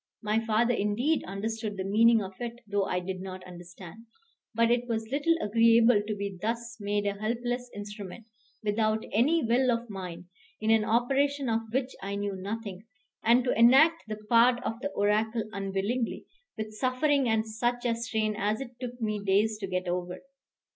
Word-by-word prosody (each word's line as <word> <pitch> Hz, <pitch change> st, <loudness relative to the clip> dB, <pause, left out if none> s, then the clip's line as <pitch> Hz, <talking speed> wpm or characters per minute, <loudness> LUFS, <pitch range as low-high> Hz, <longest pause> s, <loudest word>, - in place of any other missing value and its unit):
My 215 Hz, +2 st, +1 dB
father 230 Hz, +2 st, +2 dB
indeed 235 Hz, +9 st, 0 dB
understood 210 Hz, +2 st, -4 dB
the 190 Hz, -, -2 dB
meaning 220 Hz, +3 st, +4 dB
of 190 Hz, 0 st, -7 dB
it 240 Hz, 0 st, -6 dB
though 205 Hz, -1 st, 0 dB
I 180 Hz, -, -1 dB
did 185 Hz, +1 st, -5 dB
not 185 Hz, -1 st, -7 dB
understand; 180 Hz, +4 st, -12 dB, 0.4 s
but 230 Hz, 0 st, +2 dB
it 240 Hz, 0 st, +1 dB
was 225 Hz, -2 st, -2 dB
little 295 Hz, +4 st, +2 dB
agreeable 230 Hz, 0 st, +4 dB
to 210 Hz, 0 st, -4 dB
be 200 Hz, -2 st, -5 dB
thus 230 Hz, +1 st, -3 dB
made 205 Hz, 0 st, -1 dB
a 200 Hz, 0 st, -2 dB
helpless 245 Hz, +2 st, -2 dB
instrument, 205 Hz, +1 st, -8 dB, 0.4 s
without 215 Hz, +1 st, 0 dB
any 290 Hz, +9 st, +3 dB
will 250 Hz, +3 st, +2 dB
of 235 Hz, -1 st, -1 dB
mine, 180 Hz, -3 st, -7 dB, 0.3 s
in 220 Hz, +1 st, +1 dB
an 225 Hz, -1 st, +4 dB
operation 270 Hz, +4 st, +1 dB
of 225 Hz, -1 st, -1 dB
which 260 Hz, +1 st, -1 dB
I 200 Hz, +1 st, -4 dB
knew 200 Hz, -1 st, -2 dB
nothing; 200 Hz, +1 st, -6 dB, 0.4 s
and 240 Hz, +2 st, +5 dB
to 250 Hz, -, +1 dB
enact 275 Hz, +9 st, +6 dB
the 215 Hz, -1 st, -4 dB
part 240 Hz, +2 st, +5 dB
of 225 Hz, -, -3 dB
the 285 Hz, -, -2 dB
oracle 215 Hz, +3 st, +1 dB
unwillingly, 200 Hz, +4 st, -2 dB, 0.3 s
with 215 Hz, 0 st, -5 dB
suffering 255 Hz, +3 st, +1 dB
and 220 Hz, 0 st, +1 dB
such 240 Hz, +3 st, -2 dB
a 235 Hz, -, +2 dB
strain 220 Hz, -2 st, -1 dB
as 210 Hz, +1 st, -1 dB
it 250 Hz, -2 st, -9 dB
took 245 Hz, -1 st, -6 dB
me 215 Hz, -3 st, -2 dB
days 210 Hz, +2 st, +2 dB
to 195 Hz, -, -4 dB
get 185 Hz, 0 st, -2 dB
over. 180 Hz, +1 st, -3 dB
220 Hz, 175 wpm, -28 LUFS, 205-240 Hz, 0.4 s, enact